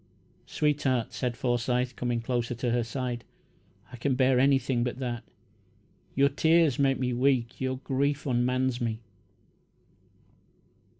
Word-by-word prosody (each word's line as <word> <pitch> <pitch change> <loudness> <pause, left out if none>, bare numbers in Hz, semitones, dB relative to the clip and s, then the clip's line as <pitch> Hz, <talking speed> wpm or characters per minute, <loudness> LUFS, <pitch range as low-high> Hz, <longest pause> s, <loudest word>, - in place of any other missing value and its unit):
"Sweetheart," 135 -5 0
said 125 -2 -2
Forsyth, 125 0 0
coming 120 -1 -1
closer 120 0 -2
to 120 0 -1
her 120 0 +1
side, 120 0 -4 0.7
"I - - -9
can 130 +2 0
bear 130 -1 +3
anything 135 -2 +2
but 125 0 -3
that. 120 -3 -3 0.9
Your 140 +1 +5
tears 160 0 +3
make 135 -1 +3
me 125 -1 -1
weak 125 -1 +1
your 130 0 -1
grief 140 +2 0
unmans 125 0 0
me." 115 -1 -2
125 Hz, 125 wpm, -28 LUFS, 120-135 Hz, 0.9 s, Your